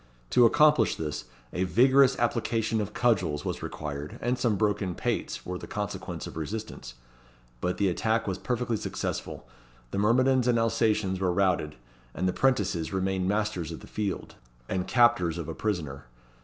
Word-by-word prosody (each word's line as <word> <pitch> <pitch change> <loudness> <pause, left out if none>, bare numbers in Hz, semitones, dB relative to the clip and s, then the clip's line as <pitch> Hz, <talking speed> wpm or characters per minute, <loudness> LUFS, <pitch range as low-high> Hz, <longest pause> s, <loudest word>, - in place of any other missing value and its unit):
To 120 -1 +7
accomplish 150 -2 +4
this, 75 -2 -4 0.3
a 90 - 0
vigorous 130 +7 +5
application 115 -2 0
of 105 0 -4
cudgels 95 -11 +1
was - - -3
required, 75 -1 -5
and 120 +1 0
some 120 -4 +1
broken 105 -3 0
pates - - -2
were 90 0 -4
the - - -8
consequence 105 -1 -4
of - - -9
resistance; 80 - -6 0.6
but 90 +5 -1
the 100 - +2
attack 110 +5 0
was 95 -1 -2
perfectly 120 -2 -1
successful; - - -4 0.4
the - - -1
myrmidons 125 +4 +3
and 120 -1 +3
Alsatians 110 -4 +1
were 95 -2 +1
routed, 90 -5 +1 0.4
and 90 - 0
the 90 - +1
'prentices 100 -11 +1
remained 95 -1 0
masters 105 -5 -1
of 80 - -7
the - - -11
field, 105 -3 -4 0.3
and 90 -1 -2
captors 120 -9 +3
of 85 -4 -5
a - - -4
prisoner. 75 - -3
105 Hz, 160 wpm, -28 LUFS, 90-115 Hz, 0.6 s, To